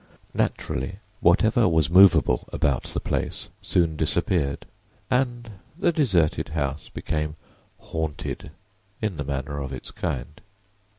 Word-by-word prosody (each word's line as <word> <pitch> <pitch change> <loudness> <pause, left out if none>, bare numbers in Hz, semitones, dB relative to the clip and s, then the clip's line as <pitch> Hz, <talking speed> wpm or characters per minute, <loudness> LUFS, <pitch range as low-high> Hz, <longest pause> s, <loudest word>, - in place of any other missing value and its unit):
Naturally, 65 +10 -1 0.2
whatever 110 +5 +4
was 80 -2 +2
movable 85 -9 +6
about 70 -5 +1
the - - -3
place - - -3
soon 85 -3 +1
disappeared 75 -2 0 0.5
and 120 -3 0 0.3
the 175 - +3
deserted 100 - +2
house 70 -2 -3
became 75 -1 -3 0.4
"haunted" 80 -2 -4 0.5
in 105 -6 -2
the 70 - -2
manner 70 +1 -3
of 70 -2 -4
its 65 - -5
kind. 75 +3 -4
80 Hz, 115 wpm, -25 LUFS, 70-95 Hz, 0.5 s, movable